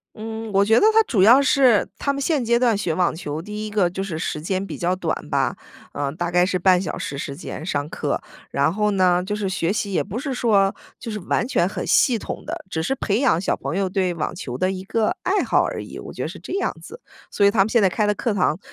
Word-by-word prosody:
嗯， 220 0 -6
我 195 +1 +4
觉 220 +3 +4
得 - - +1
他 445 0 +6
主 205 - +1
要 240 +7 +8
是 270 -6 +4
他 280 - 0
们 280 - -4
现 280 -3 0
阶 235 +1 +3
段 240 -4 +3
学 180 -5 -1
网 175 0 +1
球， 150 -2 -5
第 210 +3 -6
一 - - -6
个 200 -4 +2
就 190 +2 -4
是 165 -5 -4
时 155 -2 -3
间 190 +3 -1
比 - - -6
较 180 +1 0
短 185 - -4
吧。 - - 0 0.4
嗯， 140 0 -2
大 175 0 -1
概 180 0 +4
是 185 -1 0
半 180 0 +4
小 165 - -4
时 140 - -5
时 140 0 -5
间 155 0 -7
上 145 -4 -2
课， - - -2 0.3
然 140 +5 +1
后 210 0 +1
呢， 180 -2 +3
就 205 +2 -3
是 205 -2 -2
学 185 -1 0
习 205 -1 -2
也 - - +1
不 220 - -5
是 275 -1 -3
说 200 -5 +2 0.2
就 230 - -7
是 210 - -4
完 225 +6 -1
全 175 - +2
很 195 - -4
系 240 -4 +4
统 - - -6
的， - - -5
只 160 -3 -2
是 265 +11 0
培 215 +1 0
养 215 - +3
小 - - 0
朋 170 - -4
友 195 -1 +1
对 185 -2 0
网 165 -1 -3
球 130 -8 -6
的 185 - +1
一 190 0 -5
个 220 +2 0
爱 400 +2 +1
好 - - +3
而 - - -3
已， - - -9
我 - - -8
觉 - - -11
得 - - -2
是 - - -9
这 - - -8
样 - - 0
子。 470 - -11 0.3
所 200 - +3
以 - - +6
他 205 -2 +1
们 210 +3 +3
现 235 - +4
在 195 - +4
开 210 +3 0
的 210 - +2
课 220 +1 -1
堂 180 -3 +1
195 Hz, 290 characters per minute, -22 LUFS, 175-225 Hz, 0.4 s, 要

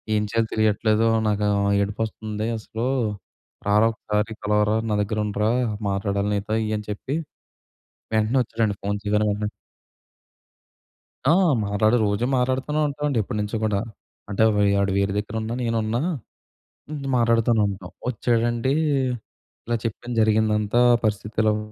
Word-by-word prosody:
ఏం 105 - +2
చేయాలో 115 -1 +1
తెలియట్లేదు 110 +1 +2 0.2
నాకు 105 0 0
ఆహ్, 100 0 +2
ఏడుపొస్తుంది 110 +1 -3
అసలు. 110 +3 -4 0.8
రారా 105 +2 +4
ఒక్కసారి 105 0 -2
కలవరా 105 0 +2 0.2
నా 105 - +2
దగ్గర 105 +1 -2
ఉండురా 105 +1 0 0.4
మాట్లాడాలి 100 +1 -1
నీతో" 105 +2 -2
ఇయన్ని 105 -1 -3
చెప్పి 130 +7 -4 1.0
వెంటనే 110 +4 +2
వచ్చాడండి 110 -2 -1
ఫోన్ 100 0 0
చేయగానే 105 0 +1
వెంటనే. 105 0 -2 1.8
ఆ! 150 - +5 0.3
మాట్లాడు 110 +3 +2
రోజు 100 +3 0
మాట్లాడుతూనే 130 +4 0
ఉంటాం 145 +1 -4
అండి 140 - 0
ఎప్పడినుంచో 105 +2 -3
కూడా. 105 -2 +1 0.5
అంటే 100 +2 +1
వే 105 - +3 0.2
వాడు 100 0 +1
వేరే 100 0 +1
దగ్గర 105 +1 -3
ఉన్నా 110 +1 -3
నేనున్నా 115 0 0 0.9
హ్మ్, 145 -2 -5
మాటాడుతూనే 115 -1 +3
ఉంటాం. 95 -2 -7 0.2
వచ్చాడండి 120 +2 +1 0.9
ఇలా 120 - 0
చెప్పాను 120 +2 -4
జరిగిందంతా, 110 0 +2 0.2
"పరిస్థితి 105 0 -2
ఇలాగ 105 0 +3
110 Hz, 125 wpm, -23 LUFS, 105-115 Hz, 1.8 s, ఆ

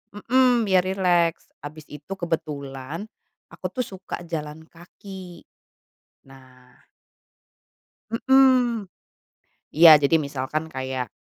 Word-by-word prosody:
mhm, 245 +2 +2
biar 185 -2 +3
rileks 175 -3 0
habis 150 +1 -9
itu 150 +5 -8
kebetulan 150 -1 -5 0.5
aku - - -13 0.2
tuh - - -3
suka 185 -2 -8
jalan 155 -1 -6
kaki, 180 0 -12 0.9
nah 130 -2 -19 1.4
Mhm, 250 -4 +3 0.9
iya, 160 -2 +9
jadi 145 +3 +3
misalkan 145 0 -3
kayak, 130 -3 -5
165 Hz, 90 wpm, -23 LUFS, 140-195 Hz, 1.4 s, iya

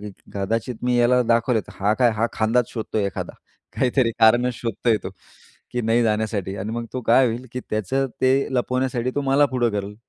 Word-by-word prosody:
की 105 0 -7 0.2
कदाचित 115 +5 -2
मी 125 0 +1
याला 125 +1 +4
दाखवलं, 115 0 +2
तर - - -10
हा 100 +2 +2
काय 120 0 +3
हा 115 +2 +2
खांदाच 115 +2 +1
शोधतोय 110 -2 -2
एखादा, 95 - -5 0.4
काहीतरी 125 -1 +2
कारणं 120 +3 +5
शोधतोय 115 -1 0
तो - - -5 0.6
की 125 - -1
नाही 115 +1 +2
जाण्यासाठी. 105 -3 -1
आणि 100 +3 -4
मग 115 0 -4
तो 130 - -3
काय 120 +3 +4
होईल 120 +2 -3
की 125 - -4
त्याचं 120 +6 0
ते 130 +1 +3
लपवण्यासाठी 125 0 0
तो 145 - 0
मला 140 +1 +3
पुढं 125 -3 0
करेल, 100 0 -4
120 Hz, 190 wpm, -22 LUFS, 110-125 Hz, 0.6 s, कारणं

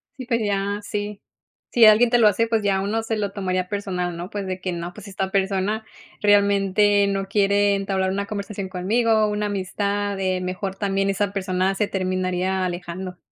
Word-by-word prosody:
Sí 260 - -7
pues 235 -1 0
ya, 200 0 -1
sí. 205 0 -5 0.5
Si 235 -2 +6
alguien 220 +3 +7
te 240 - +4
lo 225 -3 +6
hace, 225 +3 +2
pues 225 -2 0
ya 195 -1 +2
uno 220 +3 -1
se 225 0 -2
lo 205 -2 -2
tomaría 185 -2 -1
personal, 180 -3 -3
¿no? 175 +2 -6
Pues 205 -1 -4
de 185 0 -4
que 185 - -2
no, 175 +1 -5
pues 210 -1 -11
esta 190 0 -3
persona 195 +2 0 0.4
realmente 200 0 +4
no 195 0 -1
quiere 200 0 +3
entablar 195 -1 -1
una 200 +1 -2
conversación 200 -2 -5
conmigo, 215 +4 +2
una 210 0 -1
amistad, 200 +1 -2
eh, 185 -1 0
mejor 185 +1 -4
también 195 0 0
esa 200 0 -1
persona 190 0 0
se 205 +1 0
terminaría 185 0 -1
alejando. 180 +1 -5
200 Hz, 185 wpm, -23 LUFS, 190-205 Hz, 0.5 s, alguien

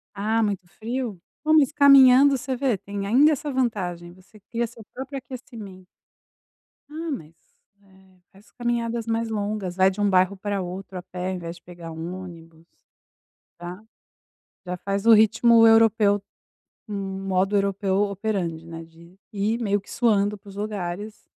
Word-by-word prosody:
Ah, 220 +3 0
muito 195 -4 -2
frio, 225 0 -5 0.3
ah, 310 - +3
mas 300 -3 +5
caminhando 275 -1 +7
você 260 +1 -3
vê, 250 -5 0
tem 200 +1 -6
ainda 280 +8 +5
essa 295 0 -2
vantagem, 180 -9 -2
você 185 +3 -20
cria 235 +4 -3
seu 225 -1 -14
próprio 270 +1 -6
aquecimento. 230 -7 -11 1.1
Ah 320 +1 -5
mas, 165 - -7 0.5
eh, 190 -1 -24
faz 195 +3 -21
caminhadas 235 -1 -2
mais 225 0 -1
longas, 205 -4 -3
vai 190 0 +4
de 205 +2 -5
um 205 - +3
bairro 185 +1 +3
pra 200 +1 -3
outro 185 +1 -7
a 180 - -7
pé 180 +1 -5
em 185 - -3
vez 170 0 -7
de - - -20
pegar 170 -2 -10
um 165 +3 -6
ônibus, 165 -2 -13 0.9
está. 175 +4 -9 0.8
Já 180 0 -4
faz 200 +2 -3
o 230 - +8
ritmo 225 +2 +6
europeu, 225 -3 +4 0.7
um 195 -1 -5
modo 190 +2 +1
europeu 195 -1 0
operante, 195 -5 -3
né, 165 0 -8
de 170 +3 -18
ir 215 +3 -1
meio 205 -2 +1
que 195 - -19
suando 210 -3 +1
para 200 0 -16
os 195 - -12
lugares, 205 0 -5
200 Hz, 160 wpm, -24 LUFS, 185-230 Hz, 1.1 s, o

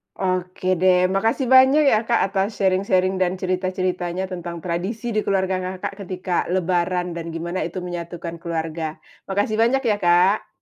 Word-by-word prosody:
Oke, 185 -1 -2
deh, 185 -1 +5 0.2
makasih 225 +7 +1
banyak 265 +3 +7
ya 215 - +5
Kak 235 - +3
atas 195 0 +1
sharing-sharing 190 -1 +2
dan 180 0 +2
cerita-ceritanya 185 -1 -1
tentang 175 -1 -5
tradisi 190 +7 -3
di 215 - +2
keluarga 190 -1 +1 0.2
Kakak 185 - -4
ketika 185 -1 -2
lebaran 180 -1 0
dan 170 -1 -5
gimana 175 +3 -3
itu - - -9
menyatukan 170 -1 -6
keluarga. 160 -2 -3 0.3
Makasih 205 +2 0
banyak 265 +4 +3
ya, 210 -2 +2
Kak. 180 +3 +3
185 Hz, 145 wpm, -22 LUFS, 175-195 Hz, 0.3 s, banyak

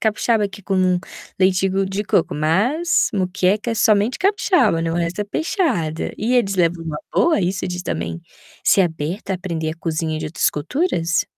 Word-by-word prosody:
capixaba, 220 -1 +1
que 200 - -11
é 190 - -25
com 185 -2 +2 0.4
leite 190 0 +3
de 195 +1 0
de 195 +2 -3
coco, 185 - +1
mas 210 - +2
moqueca 190 +4 0
é - - -1
somente 215 +2 +2
capixaba, 360 - +2
não, 165 0 -1
o - - -1
resto 175 +3 -2
é - - 0
peixada. 205 - -1
E 235 +4 0
eles 200 -5 +2
levam 170 -1 +1
numa 155 -2 -4 0.2
boa 330 -9 +3
isso 185 +1 -1
de 180 0 -4
também 85 - -4 0.4
ser 195 - +5
aberto 165 +3 -3
a 190 - +1
aprender 170 -4 -3
a 160 - -7
cozinha 160 -1 -2
de 155 - -4
outras 155 - +1
culturas? 170 - 0
185 Hz, 185 wpm, -20 LUFS, 165-210 Hz, 0.4 s, ser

